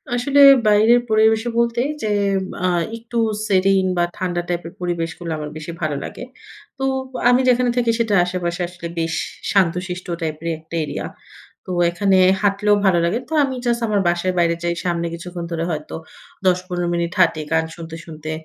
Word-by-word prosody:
আসলে 275 +4 +1 0.3
বাইরের 215 +3 +5
পরিবেশে 220 +1 +3
বলতে 235 0 +1 0.2
যে - - 0 0.6
আ - - +3 0.3
একটু 235 +1 -7 0.3
serene 190 -1 +3
বা 175 - +3
ঠান্ডা 175 -2 -1
টাইপের 170 -1 -4
পরিবেশগুলো 170 -1 -3
আমার 150 -1 -5
বেশি 155 +2 -7
ভালো 155 -2 -1
লাগে। - - -7 0.5
তো 270 - -4 0.5
আমি 245 +1 +4
যেখানে 250 0 +3
থাকি 235 -2 +3
সেটা 225 -3 +1
আশেপাশে 180 0 -3
আসলে 175 -1 -8
বেশ 165 0 -1 0.4
শান্তশিষ্ট 180 -1 0
টাইপের 160 0 -4
একটা 160 +1 -10
এরিয়া। 150 - -4 0.6
তো - - -6 0.2
এখানে 195 +2 +2 0.3
হাঁটলেও 205 +1 +3
ভালো 185 -3 +4
লাগে। 180 +8 0
তো - - -5
আমি 265 -2 -2
জাস্ট 240 0 +1
আমার 210 -2 +1
বাসার 175 +2 0
বাইরে 170 -1 +2
যাই। 170 0 0
সামনে 170 -1 -1
কিছুক্ষণ 175 +1 -6
ধরে 165 -1 -2
হয়তো 155 -1 -5 0.5
১০-১৫ 180 -1 0
মিনিট 170 0 -1
হাঁটি, 165 -3 +3
গান 160 0 +2
শুনতে, 165 -1 -8
শুনতে। 155 -1 -7
180 Hz, 165 wpm, -20 LUFS, 170-215 Hz, 0.6 s, বাইরের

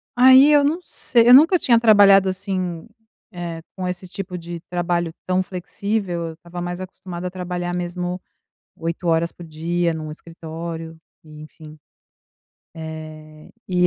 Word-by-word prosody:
aí 260 +3 +7
eu 290 -1 +5
não 305 +5 +1
sei 235 -7 +1
eu 245 - +9
nunca 320 +7 +7
tinha 235 -7 +3
trabalhado 200 -4 +6
assim, 185 -3 -4 0.5
eh, 170 -2 -6
com 185 -1 -4
esse 180 +1 -5
tipo 180 0 -6
de 170 0 -7
trabalho 175 -1 -1
tão 185 0 +1
flexível, 185 -1 -3
eu 165 - -7
estava 175 +1 -9
mais 175 0 -4
acostumada 185 -1 -8
a - - -6
trabalhar 180 -1 -4
mesmo 180 +1 -4 0.6
8 165 +2 -4
horas 165 +1 +1
por 175 - -12
dia 165 +2 -1
num 155 -1 -6
escritório 165 0 -8 0.3
e, 155 -1 -13
enfim, 155 0 -13 1.0
eh, 155 -1 -9 0.2
e 180 -1 +3
175 Hz, 145 wpm, -21 LUFS, 165-185 Hz, 1.0 s, eu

